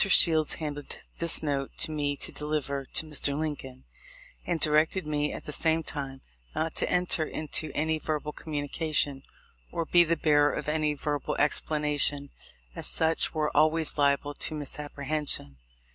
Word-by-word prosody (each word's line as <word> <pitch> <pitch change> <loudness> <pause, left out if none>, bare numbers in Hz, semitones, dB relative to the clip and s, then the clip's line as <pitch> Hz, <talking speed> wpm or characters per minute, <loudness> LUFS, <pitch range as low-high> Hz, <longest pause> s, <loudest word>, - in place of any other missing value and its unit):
Shields 160 -5 +5
handed 145 -2 -5 0.2
this 170 -1 +3
note 140 -2 -2
to - - +1
me 145 -2 -1
to - - +2
deliver 150 -2 -2
to 160 - 0
Mr. 145 -2 0
Lincoln, 140 -4 -5 0.6
and 170 -2 0
directed 155 +4 +3
me, 150 -1 -1
at - - -7
the 150 - -6
same 160 +1 +2
time, 135 -4 -6 0.3
not 160 0 -1
to - - +1
enter 180 -2 +2
into 155 0 -3
any 160 +1 0
verbal 150 -1 -3
communication, 145 -2 -1 0.5
or 165 - -2
be 175 +2 +5
the 170 0 0
bearer 145 -1 +3
of - - -4
any 150 -1 0
verbal 145 -1 -2
explanation, 145 -1 +1 0.4
as - - +3
such 160 +1 +2
were 155 -1 -1
always 155 +1 +3
liable 145 0 +2
to 155 - -1
misapprehension. 145 - -4
150 Hz, 150 wpm, -28 LUFS, 145-160 Hz, 0.6 s, Shields